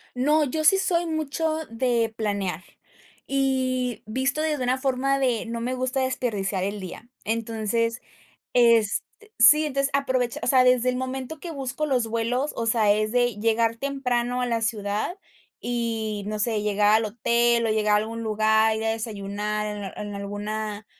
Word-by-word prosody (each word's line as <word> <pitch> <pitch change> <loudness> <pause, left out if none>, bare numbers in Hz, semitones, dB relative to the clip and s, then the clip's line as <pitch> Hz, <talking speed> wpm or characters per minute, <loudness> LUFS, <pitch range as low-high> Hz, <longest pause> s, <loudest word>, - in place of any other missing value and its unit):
No, 300 +5 +3
yo 305 +3 -2
sí 385 +6 +6
soy 350 -3 +1
mucho 315 0 -1
de 230 -1 0
planear. 200 -5 -2 0.6
Y 260 -3 0
visto 260 +7 -1
desde 300 -4 -1
una 250 +1 +1
forma 270 +1 0
de, 250 -4 0
no 230 0 -4
me 250 +2 -2
gusta 255 +1 -1
desperdiciar 210 -7 -1
el 200 +2 -3
día. 195 +6 -9
Entonces, 230 +1 -1 0.5
este 230 -4 +4 0.4
Sí, 300 +6 +7
entonces, 275 -1 0
aprovecha, 260 -3 0
o 235 - -1
sea, 255 0 +5
desde 250 0 +4
el 250 - -1
momento 260 +3 -4
que 345 - -7
busco 275 0 -3
los 250 -5 +1
vuelos, 230 +5 -1
o 230 - -1
sea, 220 -2 +3
es 215 +1 0
de 245 -3 +2
llegar 225 +1 +1
temprano 250 -2 -1
a - - +1
la 230 -2 -1
ciudad, 215 - -2 0.4
y, 225 -4 -2
no 215 0 -3
sé, 215 -1 0
llegar 210 0 +3
al 220 0 +2
hotel, 235 +2 +2
o - - +1
llegar 215 -1 +2
a - - +6
algún 225 +2 -3
lugar, 220 0 +2
ir 220 - -3
a 225 - +1
desayunar 210 -2 -3
en 210 - -6
en - - -6
alguna, 205 +1 -4
235 Hz, 170 wpm, -25 LUFS, 215-260 Hz, 0.6 s, Sí